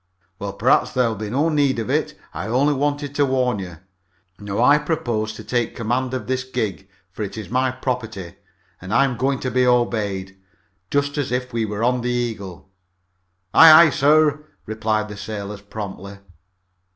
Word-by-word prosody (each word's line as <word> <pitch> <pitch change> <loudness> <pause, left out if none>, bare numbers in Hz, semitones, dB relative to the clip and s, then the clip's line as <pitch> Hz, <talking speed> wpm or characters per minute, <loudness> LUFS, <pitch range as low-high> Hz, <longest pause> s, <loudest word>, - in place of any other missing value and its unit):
"Well, 100 0 -5
perhaps 120 +6 +2
there'll 125 -3 +1
be 105 0 -5
no 145 +8 +1
need 145 -4 +2
for 115 -2 -3
it. - - -1 0.2
I - - -5
only 135 +6 +2
wanted 145 0 -2
to 145 0 +2
warn 125 -4 0
you. 90 -3 -7 0.6
Now 100 0 -4
I 145 +3 +6
propose 120 -9 -2
to - - -10
take 120 -2 -2
command 125 +2 -1
of 125 -5 -4
this 130 +2 -2
gig, 110 -7 -4 0.2
for 90 - -9
it 105 +1 -5
is 110 - -7
my 130 +1 +2
property, 110 -8 -4 0.5
and 95 +1 -8
I'm 125 +2 +3
going 135 +3 0
to 130 - -2
be 125 +2 +2
obeyed, 105 -6 0 0.5
just 145 +1 0
as 140 - -2
if 125 0 -2
we 115 -1 0
were 105 +1 -4
on 125 +1 +1
the 125 - -2
Eagle." 110 -7 -4 0.8
"Aye, 160 0 +9
aye, 155 +1 +9
sir," 150 +2 +3 0.2
replied 110 0 -1
the 105 -1 -9
sailors 105 -1 -6
promptly. 100 -1 -8
120 Hz, 175 wpm, -21 LUFS, 105-130 Hz, 0.8 s, Aye